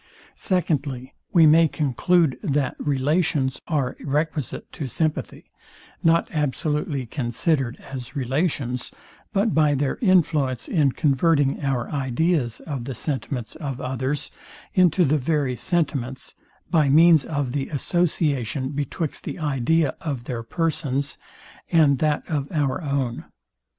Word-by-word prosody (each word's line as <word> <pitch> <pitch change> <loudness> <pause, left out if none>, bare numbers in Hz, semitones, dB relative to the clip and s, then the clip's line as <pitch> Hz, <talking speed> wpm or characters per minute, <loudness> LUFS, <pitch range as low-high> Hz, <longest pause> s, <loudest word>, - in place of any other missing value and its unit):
Secondly, 145 -8 -1 0.2
We 170 -5 +6
may 160 +2 +6
conclude, 150 +2 +1
that 145 -7 0
relations 145 -1 0
are 145 -6 -1
requisite 150 0 -2
to 145 - -5
sympathy, 155 +4 -3 0.5
not 165 0 +3
absolutely 150 -1 -1
considered 130 +1 0
as 130 +1 -7
relations, 130 -2 -1 0.4
but 205 +1 +1
by 150 -2 +3
their 140 0 -1
influence 155 - +2
in 145 -6 +2
converting 145 -1 +2
our 130 -4 0
ideas 140 -2 0
of 135 -6 -5
the 135 -1 -5
sentiments 130 -5 -3
of 140 -5 -5
others 130 +2 -2 0.4
into 180 -1 +4
the 150 +1 +2
very 140 -2 0
sentiments, 135 -7 -2 0.4
by 155 -5 +3
means 160 +1 +6
of 145 -4 -2
the 135 0 -2
association 145 -5 0
betwixt 145 +2 -3
the - - -5
idea 150 0 +1
of 140 -7 -3
their 120 -2 -4
persons, 145 0 -1 0.5
and 150 -5 +4
that 150 -1 +1
of 145 -3 -2
our 145 -2 0
own. 140 -5 -2
145 Hz, 120 wpm, -23 LUFS, 130-160 Hz, 0.5 s, We